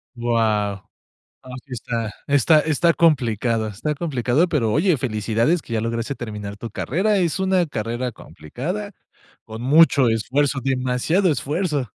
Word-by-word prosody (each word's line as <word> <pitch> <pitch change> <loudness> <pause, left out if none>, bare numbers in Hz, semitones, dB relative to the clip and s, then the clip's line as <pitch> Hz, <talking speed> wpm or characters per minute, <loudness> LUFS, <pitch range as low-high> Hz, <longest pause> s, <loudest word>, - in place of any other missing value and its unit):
Guau, 110 -4 0 0.6
ah, 130 - -13
sí 140 - -16
está 115 -2 -3 0.2
está 145 +3 +4
está 160 +2 +2
complicado 115 -8 +1
está 115 +10 -3
complicado, 145 +1 0
pero 120 -9 0
oye, 165 - +2
felicidades 115 +7 0
que - - -11
ya 110 - 0
lograste 115 +3 -3
terminar 105 -4 -7
tu 115 +1 -7
carrera. 195 - 0
Es 175 0 0
una 190 -2 +2
carrera 120 -1 -3
complicada. 180 - -6 0.5
Con 110 +1 -8
mucho 140 -1 +5
esfuerzo, 135 +6 0
demasiado 135 +8 +1
esfuerzo. 145 +1 -1
130 Hz, 135 wpm, -21 LUFS, 115-155 Hz, 0.6 s, mucho